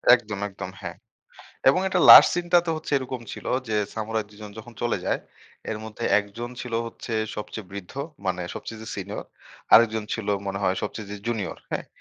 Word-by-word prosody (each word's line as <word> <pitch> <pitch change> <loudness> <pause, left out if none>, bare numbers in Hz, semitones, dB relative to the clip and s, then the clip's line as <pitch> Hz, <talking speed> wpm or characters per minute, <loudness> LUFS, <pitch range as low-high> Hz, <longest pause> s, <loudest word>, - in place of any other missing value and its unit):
একদম, 105 -4 -6
একদম। 95 -2 -7
হ্যাঁ। - - -6 0.7
এবং 160 +7 +5
এটা 185 -1 +1
লাস্ট - - +12
সিনটাতে 175 -1 +2
হচ্ছে 155 -1 -7
এরকম 130 -1 -5
ছিল - - -8 0.2
যে 105 - 0 0.2
সামুরাই 110 0 -2
২ 105 - -16
জন 105 - -8
যখন 115 +2 -10
চলে 120 - +1
যায়, - - 0 0.5
এর 105 - -3
মধ্যে 110 +1 -6
১ 105 - -2
জন 120 +1 -4
ছিল 125 -2 -6
হচ্ছে 115 0 -8 0.2
সবচেয়ে 105 -2 -6
বৃদ্ধ, 100 -3 -7 0.3
মানে 90 -1 0
সবচেয়ে 110 -1 -7
যে - - -9
সিনিয়র। 100 +1 -5 0.5
আরেকজন 110 -2 +6
ছিল 110 -3 -5 0.2
মনে 95 0 -2
হয় 95 0 +2
সবচেয়ে 105 0 -5
যে 105 - -5
জুনিয়র। 110 -5 -2
হ্যাঁ? - - -3
110 Hz, 185 wpm, -25 LUFS, 105-120 Hz, 0.7 s, লাস্ট